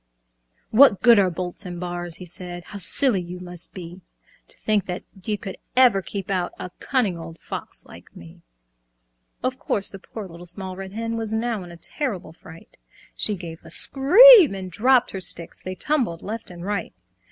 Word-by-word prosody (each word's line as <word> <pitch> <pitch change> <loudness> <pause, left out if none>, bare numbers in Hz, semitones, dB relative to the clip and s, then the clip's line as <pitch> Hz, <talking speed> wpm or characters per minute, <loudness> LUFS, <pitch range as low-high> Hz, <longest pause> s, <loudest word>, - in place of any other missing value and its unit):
"What 225 -3 +6
good 235 -3 +7
are 190 -2 +3
bolts 180 0 -6
and 175 -2 -7
bars?" 175 -1 -5
he 180 - -9
said, 175 0 -8
"How 200 - -10
silly 205 +2 +2
you 180 +1 -8
must 175 -1 -8
be 180 0 -10 0.5
To - - -4
think 210 -3 0
that 180 0 -5
they 205 +2 -4
could 200 -3 -8 0.2
ever 245 -7 +5
keep 195 0 -6
out 180 -2 -1
A 180 - -7
cunning 215 -11 -1
old 165 0 -9
Fox - - -8
like - - -15
me!" 80 -1 -14 1.0
Of 255 0 -2
course 200 - 0
the 195 - -9
poor 210 +1 -9
Little 175 0 -12
Small 185 +1 -3
Red 190 0 -8
Hen 230 +1 -3
Was 220 -1 -4
now 225 -1 -1
in 175 - -11
a 170 - -12
terrible 195 - -1
fright. 165 0 -16 0.4
She 210 - +3
gave 170 -3 -9
a - - -13
scream 365 - +7
and 185 -1 -7
dropped 250 +7 +3
her 190 - -6
sticks, 170 -2 0
They 185 0 -6
tumbled 240 - -1
left 220 +2 -6
and 175 0 -9
right. 200 -3 -3
190 Hz, 185 wpm, -23 LUFS, 175-225 Hz, 1.0 s, good